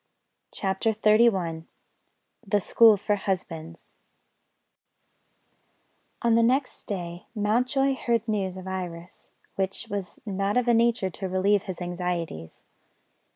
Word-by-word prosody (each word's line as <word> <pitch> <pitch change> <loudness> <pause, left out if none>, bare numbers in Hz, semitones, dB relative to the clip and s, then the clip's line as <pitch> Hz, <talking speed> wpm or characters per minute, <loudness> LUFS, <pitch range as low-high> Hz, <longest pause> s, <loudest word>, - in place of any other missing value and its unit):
CHAPTER 195 +3 -1
XXXI 210 -7 +2 0.8
THE 205 +1 +2
SCHOOL 220 +2 +6
FOR 205 +1 0
HUSBANDS 170 -4 -5 2.3
ON 235 -1 +3
the 230 - +5
next 255 +4 0
day 175 -3 -5
Mountjoy 250 +6 +1
heard 235 -3 -1
news 195 -4 -1
of 185 - -8
Iris, 175 -2 -7 0.2
which 195 0 -2
was 200 -3 -5
not 200 +1 -1
of 250 -1 +1
a 240 - +5
nature 230 -4 +2
to 190 +1 -5
relieve 195 +2 +2
his 190 -3 -7
anxieties. 175 - -4
195 Hz, 110 wpm, -26 LUFS, 180-225 Hz, 2.3 s, SCHOOL